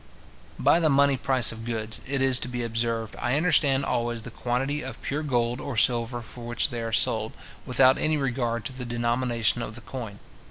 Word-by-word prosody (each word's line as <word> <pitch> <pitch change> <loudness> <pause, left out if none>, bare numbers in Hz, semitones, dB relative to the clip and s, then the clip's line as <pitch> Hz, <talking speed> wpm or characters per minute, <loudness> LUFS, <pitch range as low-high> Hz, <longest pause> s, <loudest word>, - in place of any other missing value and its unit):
By 170 - +4
the 160 -2 +2
money 140 0 +4
price 130 -2 +2
of 115 0 -9
goods, 110 -2 -4
it 135 0 -1
is 130 -2 +5
to - - 0
be 125 -1 -4
observed, 115 -1 -2
I 125 +3 +1
understand 140 -5 +3
always 120 -3 -2
the 125 - -8
quantity 135 +6 -2
of 130 - -7
pure 145 +2 -2
gold 120 -4 -1
or 135 -5 -5
silver 120 +1 +2
for 120 +2 -11
which 120 +3 0
they 120 -1 -4
are 115 0 -4
sold, 110 0 +1 0.3
without 130 +1 +5
any 155 0 +1
regard 120 -5 -2
to 130 - -4
the 130 0 -6
denomination 120 -1 0
of 110 -1 -6
the 120 - -7
coin. 115 -4 -7
120 Hz, 200 wpm, -26 LUFS, 115-135 Hz, 0.3 s, is